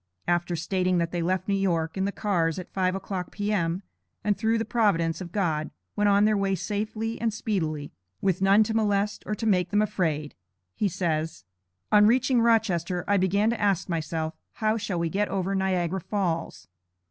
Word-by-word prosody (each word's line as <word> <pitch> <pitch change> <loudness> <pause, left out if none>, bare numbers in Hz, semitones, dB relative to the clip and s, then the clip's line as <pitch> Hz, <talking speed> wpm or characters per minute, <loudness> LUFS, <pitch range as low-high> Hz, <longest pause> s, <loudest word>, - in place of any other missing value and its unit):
After 175 0 +1
stating 185 +2 0
that 170 -1 0
they 175 - -2
left 185 +2 -1
New 200 - +1
York, 170 -5 0
in 190 0 0
the 200 - 0
cars 175 -7 0
at 180 - -8
five 185 -1 +1
o'clock, 190 -2 -4
P.M., 200 -3 -1 0.4
and 205 0 +2
through 225 +1 +1
the 225 - -1
providence 170 -8 +1
of 175 -2 -7
God, 160 -6 0 0.3
went 210 0 +2
on 200 +1 +5
their 215 0 +3
way 195 -1 +1
safely 215 +4 -3
and 230 -1 +1
speedily, 165 - -2 0.3
with 190 -1 0
none 195 +3 +6
to 220 +1 -3
molest 210 -2 +1
or 210 - -1
to 225 - -4
make 180 -5 +2
them 205 - +2
afraid, 155 -7 -1 0.4
he 210 - 0
says: 160 - -2 0.5
"On 210 0 +7
reaching 250 +1 +3
Rochester, 190 -7 +2
I 205 - +3
began 200 +4 +2
to 235 - -3
ask 200 -4 +1
myself 160 -1 -2 0.2
'how 215 0 +1
shall 200 -4 -3
we 170 0 0
get 205 +5 0
over 195 0 -1
Niagara 190 -1 0
Falls?' 170 - -2
190 Hz, 185 wpm, -26 LUFS, 170-210 Hz, 0.5 s, On